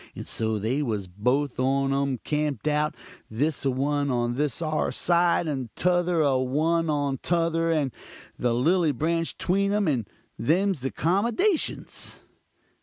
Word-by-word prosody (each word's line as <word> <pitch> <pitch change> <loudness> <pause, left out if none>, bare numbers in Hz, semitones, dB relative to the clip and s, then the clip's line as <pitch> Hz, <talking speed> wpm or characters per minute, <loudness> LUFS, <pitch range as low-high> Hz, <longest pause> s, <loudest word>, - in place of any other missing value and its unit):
And - - -7
so 110 -1 -1
they 115 +8 -1
was 110 -8 -2
both 125 +10 -1
on 135 +1 +1
um 140 -1 0
camp'd 150 -1 -1
out; 150 0 +1 0.3
this 140 +7 -1
a - - +3
one 140 +2 0
on 120 -1 0
this 145 0 -1
'ar 155 -2 -1
side, 175 0 +2
and 135 -5 -3
tother 175 -2 +2
a 135 -3 +2
one 160 +6 +1
on 145 -3 0
tother, 165 -1 +1
and 150 -6 +1 0.4
the 120 -1 0
lilly 160 +4 +2
branch 165 +5 -1
tween 200 +2 +1
um 210 -3 +1
and 120 -9 0 0.3
them's 185 +5 +2
the 135 +1 -2
'comdashins. 235 - -1
150 Hz, 150 wpm, -26 LUFS, 130-170 Hz, 0.4 s, a